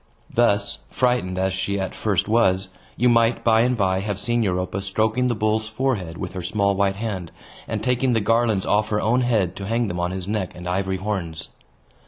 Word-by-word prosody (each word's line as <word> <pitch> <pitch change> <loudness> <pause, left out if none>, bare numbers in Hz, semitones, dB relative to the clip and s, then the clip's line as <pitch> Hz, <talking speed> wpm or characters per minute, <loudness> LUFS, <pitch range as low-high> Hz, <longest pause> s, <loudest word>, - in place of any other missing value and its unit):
Thus, 105 -4 +2
frightened 125 -8 0
as 95 0 0
she 95 +1 -1
at 95 -1 -3
first 100 -5 0
was, 95 -4 +2 0.3
you 125 - +3
might 115 0 +3
by 110 -1 +4
and 125 +1 +2
by 95 -2 +1
have 100 0 -3
seen 120 +3 0
Europa 95 -1 -1
stroking 110 +6 +1
the 120 - 0
bull's 110 +1 0
forehead 110 -8 -2
with 90 -1 -5
her 95 - -4
small 100 +2 +1
white 100 0 +1
hand, 100 -5 -4 0.4
and - - -3
taking 125 +1 +1
the 115 - +3
garlands 110 -2 +2
off 105 +1 +1
her 105 - +1
own 120 +4 +2
head 105 -8 +1
to 95 - -5
hang 115 0 0
them 90 - -3
on 90 0 0
his 95 0 -5
neck 105 -3 -2
and 90 0 -8
ivory 95 +1 -1
horns. 90 -5 -4
100 Hz, 205 wpm, -23 LUFS, 95-115 Hz, 0.4 s, by